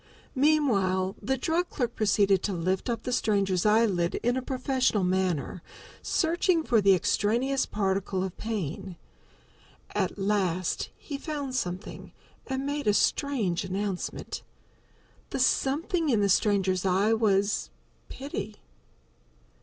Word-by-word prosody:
Meanwhile 205 -11 +2
the 265 +6 0
drug 330 +6 0
clerk 240 -3 -2
proceeded 200 -2 +3
to 205 - -2
lift 185 +5 -1
up 230 -1 -2
the 250 - -3
stranger's 200 -5 +1
eyelid 210 -6 +2
in 245 +1 +2
a 260 - -1
professional 255 -5 0
manner, 180 -4 0 0.4
searching 335 0 +1
for 230 -7 +3
the 195 -1 +6
extraneous 240 +9 +1
particle 190 -2 -1
of 190 -2 -4
pain. 195 -4 -4 1.0
At - - -1
last 190 -3 0
he 280 -2 -7
found 285 -4 -4
something, 185 -6 -4 0.3
and 265 0 -2
made 285 -3 -2
a 205 - +4
strange 225 - +1
announcement. 190 0 -4 0.9
The - - -3
something 305 +6 +1
in 230 -5 +3
the 200 - +2
stranger's 190 -2 +2
eye 195 +4 +2
was 205 - +1 0.4
Pity. - - -6
210 Hz, 120 wpm, -28 LUFS, 190-265 Hz, 1.0 s, the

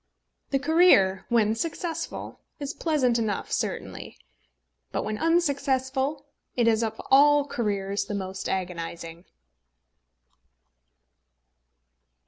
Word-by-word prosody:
The 275 - +2
career, 270 - +4
when 220 -3 +3
successful, 330 +6 -4 0.2
is 285 +1 -4
pleasant 260 -8 +1
enough 215 -3 -2
certainly; - - -4 0.7
but - - -2
when 215 0 -3
unsuccessful, 280 -3 0 0.3
it 240 -2 +2
is 225 -1 +3
of 220 -1 -3
all 290 +1 +6
careers 200 -5 -2
the 205 - -4
most 190 -1 -4
agonising. 170 -2 -5
240 Hz, 95 wpm, -26 LUFS, 200-290 Hz, 0.7 s, all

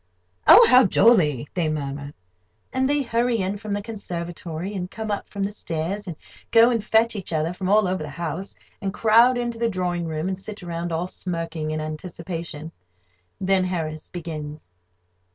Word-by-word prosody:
"Oh, - - +10
how 255 +1 +7
jolly!" 175 - +4
they 170 -4 0
murmur; 145 -1 -4 0.6
and 260 +1 +1
they 290 0 +2
hurry 235 0 +1
in 195 0 -1
from 210 -1 -4
the 205 0 -2
conservatory, 175 -4 -5
and 180 -2 -4
come 220 +1 -5
up 205 - -3
from 200 -1 -3
the 200 - -1
stairs, 190 +1 -3
and 170 - -5 0.3
go 230 +1 +6
and 230 -3 0
fetch 225 +1 +3
each 195 -4 -5
other 160 +1 0
from 185 +1 -3
all 210 -1 +4
over 185 -1 -1
the 150 - -5
house, 170 +5 -5 0.3
and 195 - -1
crowd 230 +3 +5
into 240 -1 -3
the 235 -1 +1
drawing 180 -3 -2
room, 160 +2 -2
and 190 0 -3
sit 205 0 -8
round, 170 0 -4
all 165 +2 -1
smirking 165 -4 -4
in 155 0 -2
anticipation. 165 0 -6 0.7
Then 190 0 +2
Harris 160 -4 -3
begins. 155 - -7
185 Hz, 175 wpm, -24 LUFS, 160-210 Hz, 0.7 s, Oh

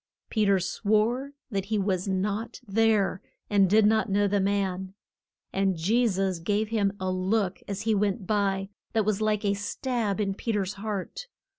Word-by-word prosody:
Pe 215 -2 +2
ter 200 -1 +5
swore 220 +8 0 0.2
that 195 -2 -1
he 215 +1 -1
was 190 -2 0
not 205 +4 -2
there, 205 -2 +2 0.3
and 195 -2 +4
did 215 +2 +5
not 220 +1 +3
know 205 +1 +2
the 200 +1 +1
man. 190 -1 -1 0.6
And 195 -2 +1
Je 225 +9 +2
sus 190 -3 0
gave 205 +5 0
him 205 -3 +1
a 185 0 -1
look 185 +1 0
as 200 0 -4
he 220 0 +2
went 200 0 0
by, 195 -1 0 0.2
that 220 -2 +2
was 215 0 0
like 215 0 +1
a 200 - +3
stab 215 +1 -2
in 195 -2 0
Pe 225 +3 -3
ter's 200 -1 -1
heart. 210 - -5
200 Hz, 175 wpm, -27 LUFS, 195-215 Hz, 0.6 s, ter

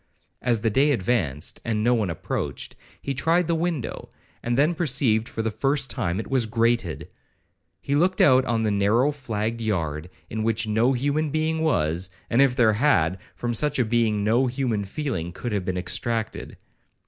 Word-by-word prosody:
As 120 -4 +1
the 110 -1 +1
day 135 +7 +3
advanced, 90 - -1
and 110 -2 -1
no 120 +2 +3
one 110 -6 0
approached, 85 - -4 0.3
he 140 - -2
tried 165 +6 +1
the 170 - +1
window, 165 -5 -3 0.3
and 120 +1 -1
then 150 +5 +3
perceived 125 -9 +1
for 115 - -4
the 110 - -1
first 135 +4 0
time 95 -7 -1
it 110 - -4
was 130 -4 +1
grated. 115 -6 0 0.8
It 140 - 0
looked 185 +4 +2
out 130 -2 +6
on 115 -2 0
the 110 - +1
narrow 105 +8 +2
flagged 115 -5 -3
yard, 85 -7 -2 0.2
in 110 - -4
which 110 0 0
no 110 +5 +2
human 145 +4 0
being 155 +2 0
was; 90 - 0 0.2
and 120 +3 +4
if 135 -2 +3
there 115 -4 +4
had, 95 - +2
from 120 -1 -2
such 150 +5 +1
a 125 - +2
being 110 -2 +1
no 120 +5 +2
human 120 -5 -1
feeling 100 - -3
could 120 - -5
have 100 -3 -2
been 90 -1 -2
extracted. 105 +5 -3
115 Hz, 180 wpm, -24 LUFS, 105-135 Hz, 0.8 s, out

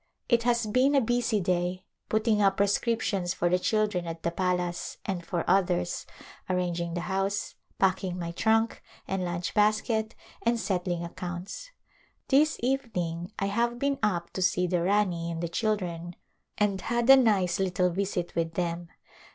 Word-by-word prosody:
It 235 -2 +3
has 235 -1 +2
been 255 +6 +3
a - - +6
busv 235 -3 +1
day, 180 +1 -1 0.2
putting 215 -1 +2
up 195 -1 +3
prescrip 210 +3 +1
tions 180 -3 -1
for 175 - +1
the 180 +1 +2
children 210 -3 0
at 165 0 -6
the 170 - 0
palace 180 -1 -1
and 185 -3 -3
for 170 0 -2
others, 180 -1 +1 0.4
ar 185 - +1
ranging 170 -1 -2
the 175 - -2
house, 195 +2 -1 0.2
packing 185 -1 +1
mv 170 -1 -4
trunk 225 +2 +2 0.3
and 190 -1 -1
lunch 175 -1 -3
basket 215 +1 +1 0.3
and 235 0 +1
settling 180 -4 -1
accounts. 180 - -6 0.6
This 300 +3 +4
evening 180 -10 -2
I 195 - -1
have 235 +4 0
been 280 +1 0
up 175 -6 0
to 185 - -4
see 180 0 +2
the 175 -1 0
Rani 180 -3 +1
and 165 -1 -4
the 170 - -2
children 175 -3 -2 0.4
and 200 -2 +1
had 240 0 0
a 270 - +10
nice 200 -9 +3
little 180 -1 +1
visit 185 -1 -2
with 165 -1 -1
them. 175 -1 -2
190 Hz, 165 wpm, -28 LUFS, 175-220 Hz, 0.6 s, a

